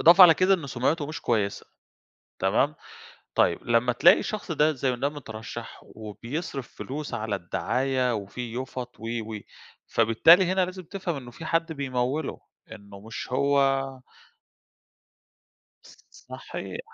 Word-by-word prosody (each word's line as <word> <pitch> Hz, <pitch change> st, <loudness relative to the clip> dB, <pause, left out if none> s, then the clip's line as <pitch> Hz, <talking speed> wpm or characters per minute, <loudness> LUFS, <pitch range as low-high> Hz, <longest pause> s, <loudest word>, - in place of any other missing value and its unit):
إضافة 175 Hz, +3 st, +8 dB
على 165 Hz, -3 st, +10 dB
كده 185 Hz, +3 st, +4 dB
إن 165 Hz, -6 st, -4 dB
سُمعته 140 Hz, +4 st, 0 dB
مش 155 Hz, -, -6 dB
كويّسة، 105 Hz, -4 st, -1 dB, 0.7 s
تمام؟ -, -, +2 dB, 0.6 s
طيب، -, -, +3 dB
لمّا 120 Hz, +1 st, +3 dB
تلاقي 175 Hz, +10 st, +6 dB
شخص 205 Hz, -5 st, -4 dB
ده، 155 Hz, +1 st, +3 dB
زي 130 Hz, -2 st, -1 dB
ده 140 Hz, +3 st, 0 dB
مترشَّح 115 Hz, -5 st, -8 dB
وبيصرِف 120 Hz, -, -6 dB
فلوس 140 Hz, -1 st, -6 dB
على 110 Hz, -3 st, -2 dB
الدعاية 125 Hz, +7 st, 0 dB
وفي 110 Hz, +3 st, -5 dB
يُفَط 125 Hz, -1 st, -5 dB
و، 115 Hz, -, -10 dB, 0.3 s
و، 105 Hz, -, -5 dB, 0.5 s
فبالتالي 165 Hz, -, +5 dB
هنا 185 Hz, +1 st, +2 dB
لازم 185 Hz, +1 st, -7 dB
تفهَم 175 Hz, -2 st, -4 dB
إنه 125 Hz, -3 st, -8 dB
في 160 Hz, +7 st, -10 dB
حد 165 Hz, 0 st, 0 dB
بيموِّله، 135 Hz, +1 st, -2 dB, 0.3 s
إنه 100 Hz, -1 st, -12 dB
مش 110 Hz, +2 st, -7 dB
هو 140 Hz, +2 st, +2 dB, 2.2 s
ص -, -, -17 dB
ص -, -, -18 dB
صحيح، -, -, -7 dB
130 Hz, 135 wpm, -26 LUFS, 120-160 Hz, 2.2 s, على